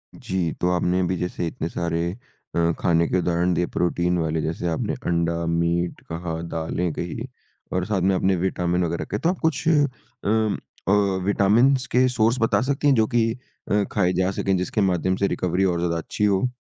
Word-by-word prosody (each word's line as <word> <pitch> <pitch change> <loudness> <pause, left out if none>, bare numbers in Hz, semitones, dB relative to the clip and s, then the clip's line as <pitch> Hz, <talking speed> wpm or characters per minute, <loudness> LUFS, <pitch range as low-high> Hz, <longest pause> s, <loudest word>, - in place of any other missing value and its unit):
जी, 90 -4 -2
तो 90 - +2
आपने 90 +1 +1
अभी 90 0 0
जैसे 90 -1 -3
इतने 80 +1 -4
सारे 85 -1 -2 0.6
अ, 85 0 +3
खाने 85 -1 +2
के - - +1
उदाहरण 90 0 +1
दिए 90 +1 +1
प्रोटीन 90 0 +1
वाले 80 -1 0
जैसे 80 +2 -2
आपने 80 - -1
अंडा, 85 -1 0
मीट 85 +1 0
कहा 80 0 -4 0.2
दालें 80 +1 -2
कहीं, 110 - -5 0.4
और 90 0 0
साथ 100 -3 0
में 95 +1 +3
आपने 95 +1 +2
विटामिन 90 0 0
वगैरह 85 0 -2
कहे 105 - -3
तो 170 - +1
आप 185 - -2
कुछ 160 -1 0
उम, 120 -7 0 0.3
अ, - - +3 0.3
विटामिनस 120 +7 +3
के 130 +1 +4
सोर्स 120 0 +2
बता 115 - +3
सकती 145 +1 0
हैं 140 - +5
जो 110 -1 +3
कि 115 -2 +2 0.4
अ, 105 0 +3
खाए 90 -3 +2
जा 95 +2 +1
सके 95 0 -1
जिसके 90 +4 -1
माध्यम 95 -1 +1
से 100 +1 +1
रिकवरी 90 +1 0
और 85 - -2
ज़्यादा 85 -1 0
अच्छी 95 +5 -4
हो? 100 +5 +2
90 Hz, 190 wpm, -23 LUFS, 85-105 Hz, 0.6 s, हैं